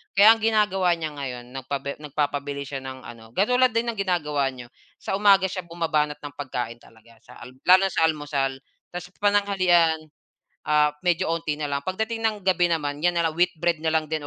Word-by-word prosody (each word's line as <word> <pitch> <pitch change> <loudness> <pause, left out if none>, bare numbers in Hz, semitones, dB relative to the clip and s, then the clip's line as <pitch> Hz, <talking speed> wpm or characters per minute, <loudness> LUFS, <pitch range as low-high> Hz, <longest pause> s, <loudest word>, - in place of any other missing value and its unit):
kaya 205 +3 +8
ang 225 - +3
ginagawa 210 -5 +2
niya 160 -2 -5
ngayon 125 -4 -6
nagpa 135 +1 -4
nag-papabili 145 -1 -3
siya 140 0 -6
ng 130 0 -9
ano, 115 -1 -11
katulad 250 +6 +3
din 235 +1 +1
ng 215 - -10
ginagawa 150 -7 0
niyo, 125 -2 -8 0.2
sa 195 - -3
umaga 200 -2 +5
siya 185 -1 -4
buma-banat 155 -3 -1
ng 145 - -7
pag-kain 120 -4 -4
talaga 115 0 -20
saka 120 - -13 0.2
lalo 185 +1 +7
sa - - +1
almusal 145 -3 -2 0.4
ta's 180 0 -5
pananghalian, 185 -6 +2 0.6
ah, 150 -1 +4
medyo 175 0 +1
onti 165 -2 -2
nalang 145 -2 -2
pagdating 220 +4 -3
ng 220 -1 +2
gabi 180 -2 +3
naman 145 -3 -2
yan 175 - +4
nalang 165 -1 +1
wheat 180 +1 +3
bread 170 -1 +2
nalang 160 -1 +1
din, 155 0 -2
160 Hz, 175 wpm, -24 LUFS, 140-185 Hz, 0.6 s, kaya